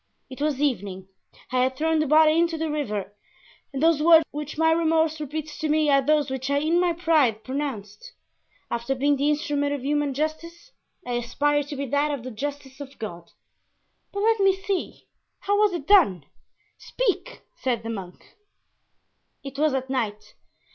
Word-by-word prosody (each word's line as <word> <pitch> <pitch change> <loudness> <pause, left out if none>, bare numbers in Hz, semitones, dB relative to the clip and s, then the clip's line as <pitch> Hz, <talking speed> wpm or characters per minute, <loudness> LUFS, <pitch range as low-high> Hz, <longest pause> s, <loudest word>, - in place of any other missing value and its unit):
It 260 - -9
was 295 -3 0
evening; 195 -9 -2 0.4
I 255 0 +2
had 260 +1 +1
thrown 320 +1 +1
the 310 - +1
body 310 +1 +5
into 335 -1 +1
the 320 -1 -2
river 210 -10 -3 0.6
and 275 +1 -3
those 325 -2 +4
words 325 0 +7
which 300 0 -6
my 320 0 +3
remorse 320 -1 +1
repeats 300 +1 -5
to 310 - -2
me 305 -1 +3
are 275 0 +5
those 295 0 +1
which 265 +1 -3
I 280 - +2
in 315 +4 +2
my 355 -1 +2
pride 310 -10 +2
pronounced. 265 - -5 0.6
After 235 +3 -1
being 285 +2 +2
the 285 +2 +1
instrument 290 -1 0
of 270 -2 -7
human 290 -1 0
justice 335 - -4 0.3
I 245 - -3
aspired 285 +5 0
to 290 - -6
be 280 0 -3
that 285 +3 +1
of 285 -5 -3
the 255 - -6
justice 275 +3 -6
of 280 -1 -10
God." 175 -6 -7 0.8
"But 400 - -3
let 450 0 +3
me 390 -1 +4
see, 385 -1 -4 0.4
how 405 +1 +1
was 420 -1 +4
it 345 -6 -5
done? 295 - +4 0.5
Speak," - - -2 0.2
said 240 -4 -1
the 225 - -4
monk. 190 -5 -8 1.2
"It 275 0 -8
was 305 -2 +2
at 260 0 -2
night. 210 -5 -3
290 Hz, 175 wpm, -25 LUFS, 260-320 Hz, 1.2 s, words